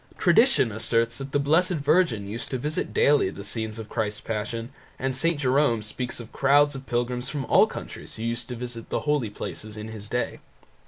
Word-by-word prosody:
Tradition 175 - +4
asserts 115 +2 0
that 135 0 -6
the - - +2
Blessed 160 +5 +3
Virgin 145 - +2
used 115 +4 -4
to 130 - -1
visit 150 +5 -2
daily 145 -9 +4
the 100 - -8
scenes 110 +1 -3
of 110 -1 -7
Christ's 105 -2 -2
Passion 115 +2 -4 0.3
and 130 0 -1
St. 165 +3 +1
Jerome 130 -4 +2
speaks 125 +4 -4
of 115 -2 -9
the - - -15
crowds 145 +1 +5
of 135 -1 -8
pilgrims 125 +1 -1
from 145 -3 -3
all - - +5
countries - - -8
who 110 - -6
used 115 +1 -2
to 125 - -5
visit 120 -1 -6
the - - -1
holy 150 -7 +1
places 105 +1 -6
in 105 +1 -6
his 105 -2 -8
day. 125 0 -2
125 Hz, 205 wpm, -26 LUFS, 110-145 Hz, 0.3 s, crowds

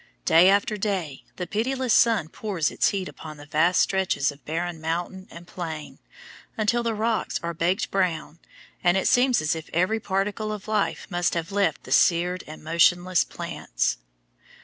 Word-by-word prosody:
Day 175 +3 +6
after 205 +2 +2
day 190 -9 -3
the 180 - -4
pitiless 250 +5 -1
sun 225 -9 +4
pours 175 -4 -2
its - - +2
heat 195 -2 -1
upon 155 -1 -10
the 145 - -11
vast 160 +5 +3
stretches 190 -7 +1
of 145 0 -17
barren 165 +1 -3
mountain 175 +4 -3
and 170 +1 -11
plain, 160 -4 -7 0.6
until 225 +2 +1
the 230 -1 -1
rocks 220 +1 -1
are 170 0 -2
baked 175 +5 0
brown 165 -4 -1 0.4
and 175 +1 +4
it 190 - +1
seems 245 -6 +3
as 155 +2 +1
if 160 -1 -8
every 185 +7 +1
particle 205 +2 -2
of 210 -1 -7
life 215 -2 -1
must 175 0 0
have 165 +1 -3
left 200 0 0
the - - -11
seared 180 +1 +3
and 155 0 -10
motionless 175 +2 +3
plants. - - -3
180 Hz, 170 wpm, -25 LUFS, 165-205 Hz, 0.6 s, Day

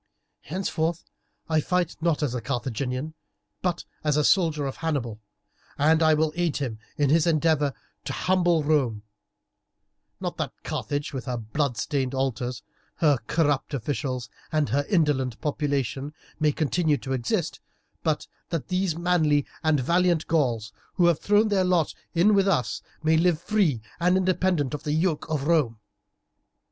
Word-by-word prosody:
Henceforth, 170 -1 -2 0.4
I 160 -1 +2
fight 180 0 0
not 160 -2 +1
as 135 -5 0
a 125 - -2
Carthaginian, 130 +3 -3 0.5
but 175 -2 -1 0.2
as 150 -1 +2
a 150 - +3
soldier 160 -5 +3
of 135 - -4
Hannibal, 130 -10 -2 0.6
and 160 +3 +4
will 155 -1 +3
aid 175 -3 0
him 120 -6 -3 0.2
in 145 -2 +2
his 165 +1 +4
endeavour 155 -3 +2 0.3
to - - -3
humble 175 -3 +2
Rome; 135 -9 +1 1.2
not - - -4
that - - -3
Carthage, 145 0 -3
with 130 - -4
her 125 -2 -2
blood 120 +3 -2
stained 135 +2 -1
altars, 130 -2 -2 0.3
her 145 -5 +3
corrupt 145 -3 +1
officials, 130 -1 -3 0.2
and 155 -2 +1
her 140 +5 0
indolent 140 - +1
population, 145 -1 -2 0.2
may 155 -1 +3
continue 155 +1 +1
to 135 +1 -4
exist, 120 -3 -1 0.4
but - - 0 0.2
that 165 -4 -3
these 185 -3 0
manly 160 -5 +2 0.2
and 155 -2 +3
valiant 170 +4 +2
Gauls 120 -9 0 0.2
who 175 - +4
have 170 -2 +4
thrown 205 +1 +4
in - - 0
their 195 -2 +3
lot 180 -3 +2 0.2
with 195 +3 +4
us 160 -10 +1 0.2
may 160 0 +4
live 170 -1 +3
free 170 - +1 0.2
and 180 +2 +3
independent 185 -6 +1
of 150 - -3
the 150 - -2
yoke 160 0 0
of 150 -3 -1
Rome. 145 -8 +2
150 Hz, 150 wpm, -26 LUFS, 135-170 Hz, 1.2 s, and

